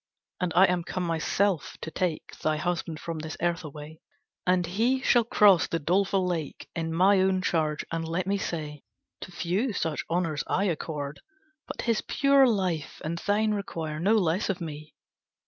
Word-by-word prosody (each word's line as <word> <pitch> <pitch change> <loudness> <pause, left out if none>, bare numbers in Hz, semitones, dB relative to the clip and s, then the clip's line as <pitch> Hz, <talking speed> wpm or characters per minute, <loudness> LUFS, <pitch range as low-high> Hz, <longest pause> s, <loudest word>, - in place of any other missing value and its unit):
"And 180 -2 -1
I 185 +2 +8
am 180 -2 0
come 185 +2 -3
myself 170 +1 0
to 160 - -5
take 175 -1 -2
Thy 155 0 0
husband 165 0 -2
from 165 -2 -5
this 160 0 -6
earth 170 0 0
away, 150 +1 -9 0.5
And 180 -1 +3
he 235 +9 +1
shall 240 -2 +4
cross 205 -5 +5
the 165 - -1
doleful 190 +4 +1
lake 170 -5 -3
In 165 -1 -2
my 190 +4 +4
own 190 0 +2
charge, 155 -4 0
and 165 0 -2
let 170 +2 -1
me 200 +1 0
say 150 -5 -4 0.4
To - - -8
few 185 +8 -1
such 160 -5 -2
honours 165 -3 0
I 195 - +1
accord, 150 -5 -3 0.5
But - - -5
his 230 -2 +1
pure 275 -1 +4
life 185 -9 -1
and 170 +2 -2
thine 210 +3 +1
require 160 -6 -4
No 195 +6 +3
less 185 -2 +1
from 185 -3 -2
me." 155 -1 -9
175 Hz, 175 wpm, -27 LUFS, 160-195 Hz, 0.5 s, I